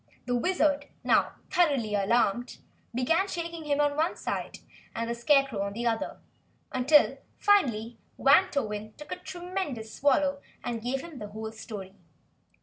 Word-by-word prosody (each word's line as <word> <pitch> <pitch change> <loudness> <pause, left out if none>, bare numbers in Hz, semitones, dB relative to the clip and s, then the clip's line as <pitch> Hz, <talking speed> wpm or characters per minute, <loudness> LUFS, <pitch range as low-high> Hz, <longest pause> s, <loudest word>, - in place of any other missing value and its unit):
The 245 - -1
Wizard, 290 -1 +1 0.2
now - - +3 0.2
thoroughly 275 -11 +2
alarmed, 220 +3 +1 0.3
began 325 +11 +2
shaking 335 -3 -5
him 290 -1 +1
on 290 -1 +2
one 320 +4 +1
side - - -4 0.4
and 230 0 -2
the 235 - -1
Scarecrow 270 -2 +2
on 200 0 -2
the 235 +3 -4
other, 225 -1 -1 0.5
until 270 +4 +4 0.2
finally 240 - +2 0.2
Wantowin 270 - +2
took 300 0 -11
a - - -2
tremendous 350 - -5
swallow 280 0 +2 0.2
and 235 -2 -3
gave 260 +3 -2
them 330 -6 -9
the 210 - -6
whole 220 +1 -6
story. 210 -4 -8
265 Hz, 145 wpm, -28 LUFS, 225-305 Hz, 0.5 s, until